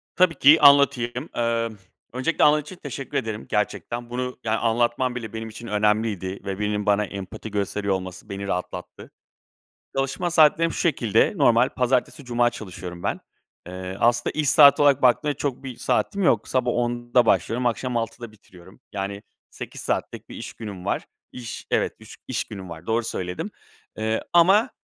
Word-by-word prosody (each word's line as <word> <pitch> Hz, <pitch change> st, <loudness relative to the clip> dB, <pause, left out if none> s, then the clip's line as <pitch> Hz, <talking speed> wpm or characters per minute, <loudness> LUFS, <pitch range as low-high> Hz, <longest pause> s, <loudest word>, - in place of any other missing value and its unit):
Tabii 180 Hz, -3 st, +4 dB
ki. 150 Hz, +3 st, +6 dB
Anlatayım. 140 Hz, -2 st, +4 dB
Iıı, 115 Hz, -2 st, -1 dB, 0.4 s
öncelikle 130 Hz, +6 st, 0 dB
anladığın 150 Hz, 0 st, +5 dB
için 150 Hz, +6 st, -11 dB
teşekkür 140 Hz, -5 st, -6 dB
ederim 110 Hz, -1 st, -3 dB
gerçekten. 105 Hz, +3 st, -2 dB
Bunu, 125 Hz, +1 st, -4 dB
yani, 110 Hz, 0 st, 0 dB
anlatman 120 Hz, +2 st, +1 dB
bile 115 Hz, -3 st, -6 dB
benim 110 Hz, 0 st, -5 dB
için 115 Hz, +2 st, -10 dB
önemliydi. 105 Hz, -2 st, 0 dB
Ve 95 Hz, 0 st, -4 dB
birinin 105 Hz, 0 st, -1 dB
bana 105 Hz, 0 st, +2 dB
empati 100 Hz, +2 st, -8 dB
gösteriyor 100 Hz, 0 st, -1 dB
olması 95 Hz, -1 st, -6 dB
beni 100 Hz, 0 st, -5 dB
rahatlattı. 90 Hz, -1 st, -5 dB, 0.8 s
Çalışma 135 Hz, +6 st, -1 dB
saatlerim 165 Hz, 0 st, +4 dB
şu -, -, -5 dB
şekilde: 115 Hz, -, +2 dB
Normal 120 Hz, +2 st, +4 dB
pazartesi-cuma 125 Hz, -1 st, 0 dB
çalışıyorum 90 Hz, -4 st, -8 dB
ben. -, -, -1 dB, 0.5 s
Eee, 95 Hz, +1 st, -6 dB
aslında 120 Hz, +1 st, +2 dB
iş 150 Hz, -3 st, +1 dB
saati 145 Hz, -1 st, +7 dB
olarak 140 Hz, -2 st, +4 dB
baktığında 135 Hz, +4 st, +3 dB
çok 140 Hz, -1 st, -4 dB
bir 130 Hz, -2 st, -6 dB
saatim 200 Hz, -, 0 dB
yok. 115 Hz, -, +2 dB
Sabah 125 Hz, -2 st, +1 dB
10.00'da 120 Hz, 0 st, +1 dB
başlıyorum 115 Hz, +6 st, +1 dB
akşam 120 Hz, +1 st, -1 dB
18.00'de 115 Hz, 0 st, -5 dB
bitiriyorum. 95 Hz, -2 st, -18 dB
Yani 100 Hz, 0 st, -4 dB, 0.3 s
8 -, -, -9 dB
saatlik -, -, -3 dB
bir -, -, -9 dB
iş -, -, -7 dB
günüm 100 Hz, -5 st, -8 dB
var. -, -, -1 dB, 0.3 s
İş, 120 Hz, -2 st, -8 dB
evet, -, -, +1 dB
üç -, -, -13 dB
iş -, -, -2 dB
günüm 95 Hz, -3 st, -9 dB
var, 85 Hz, 0 st, -9 dB
doğru 115 Hz, +1 st, 0 dB
söyledim. 90 Hz, -4 st, -4 dB, 0.5 s
Eee, 110 Hz, 0 st, -1 dB
ama, 195 Hz, +8 st, +5 dB
115 Hz, 160 wpm, -24 LUFS, 105-130 Hz, 0.8 s, saati